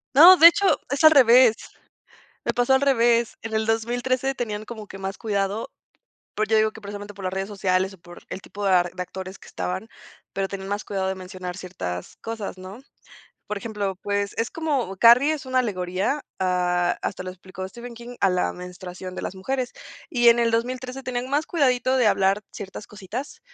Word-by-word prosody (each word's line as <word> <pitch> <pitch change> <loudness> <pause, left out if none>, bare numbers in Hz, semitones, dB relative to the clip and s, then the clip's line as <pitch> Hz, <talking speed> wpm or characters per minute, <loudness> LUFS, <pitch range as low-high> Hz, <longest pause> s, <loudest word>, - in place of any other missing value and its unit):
No, 345 +6 +10
de 330 +2 +11
hecho, 340 +4 +4 0.2
es 280 +2 -1
al 310 - +10
revés. 250 -4 +7 0.9
Me - - 0
pasó 245 +2 +3
al 265 - +4
revés. 235 -4 +3
En 225 - -6
el 220 0 0
2013 245 +4 0
tenían 215 -4 -4
como 215 -2 -8
que 195 - -10
más 195 0 -5
cuidado. 200 0 -2 0.7
Pues, 215 +1 -1
yo 220 - +4
digo 215 0 +3
que 220 - -13
precisamente 205 0 -8
por 195 -1 -11
las 185 0 -2
redes 195 +1 -2
sociales, 190 -1 0
o - - -14
por 175 +1 -14
el 190 - -6
tipo 205 +1 -7
de 195 - +3
ar 175 -1 +3
de 185 - -6
actores 190 +1 -7
que - - -15
estaban, 185 +5 -4 0.5
pero 195 0 -1
tenían 195 -1 -6
más 205 +1 -2
cuidado 190 -2 -2
de 190 - -1
mencionar 185 -1 -7
ciertas 90 - -6
cosas, 225 -4 -6
¿no? 190 +6 -10 0.7
Por 210 - -4
ejemplo, 200 -3 -3
pues 200 0 -1
es 230 - 0
como, 280 - -2
Carrie 245 +8 +6
es 290 -3 -5
una 255 0 +1
alegoría, 190 +5 -1 0.2
ah, 180 -1 +1
hasta 185 - -3
lo 185 - -5
explicó 185 0 -8
Stephen 235 +4 -10
King, 240 +1 -10
a 195 - +4
la 180 0 0
menstruación 180 0 -8
de - - -5
las - - -4
mujeres. 255 +6 -3 0.4
Y 240 -3 +4
en 235 0 +6
el 235 -1 +3
2013 255 +3 -2
tenían 250 -1 -3
más 295 +3 +1
cuidadito 260 -5 +2
de 245 -4 +3
hablar 195 +1 +2
ciertas 200 +1 -8
cositas, 210 +7 -7
210 Hz, 200 wpm, -24 LUFS, 190-245 Hz, 0.9 s, de